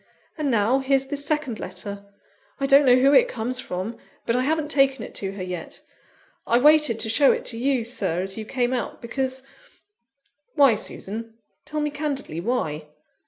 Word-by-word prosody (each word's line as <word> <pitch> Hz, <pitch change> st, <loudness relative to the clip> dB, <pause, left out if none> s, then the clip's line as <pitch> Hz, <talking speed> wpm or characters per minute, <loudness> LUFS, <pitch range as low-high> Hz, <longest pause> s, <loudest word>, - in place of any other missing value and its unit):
And 300 Hz, -3 st, -2 dB
now, 230 Hz, +2 st, +2 dB
here's 270 Hz, 0 st, +1 dB
this 285 Hz, +1 st, -4 dB
second 290 Hz, -6 st, -2 dB
letter; 200 Hz, +2 st, -8 dB, 0.5 s
I 275 Hz, -, 0 dB
don't 275 Hz, 0 st, +5 dB
know 250 Hz, -, +7 dB
who 270 Hz, +3 st, +4 dB
it -, -, +6 dB
comes 250 Hz, -, -2 dB
from 200 Hz, 0 st, -5 dB, 0.3 s
but 230 Hz, -, 0 dB
I 250 Hz, -, +2 dB
haven't 305 Hz, +2 st, -1 dB
taken 270 Hz, -4 st, +2 dB
it -, -, -9 dB
to 195 Hz, -1 st, -4 dB
her 195 Hz, -2 st, -6 dB
yet; 180 Hz, -3 st, -7 dB, 0.7 s
I 235 Hz, -, +4 dB
waited 300 Hz, -3 st, +5 dB
to -, -, +1 dB
show 275 Hz, +5 st, +5 dB
it -, -, -2 dB
to 230 Hz, -, -1 dB
you, 260 Hz, -2 st, +1 dB
Sir, 190 Hz, -8 st, -2 dB
as 195 Hz, 0 st, -4 dB
you 220 Hz, -, -5 dB
came 245 Hz, +2 st, -1 dB
out, 250 Hz, -, -3 dB
because 260 Hz, +2 st, -3 dB, 0.5 s
" 275 Hz, +4 st, -48 dB
"Why, 280 Hz, -5 st, +6 dB
Susan? 220 Hz, +2 st, -5 dB, 0.3 s
tell 305 Hz, 0 st, -3 dB
me 295 Hz, 0 st, -1 dB
candidly 285 Hz, -, -4 dB
why?" 160 Hz, -9 st, -2 dB
255 Hz, 185 wpm, -24 LUFS, 220-280 Hz, 0.7 s, know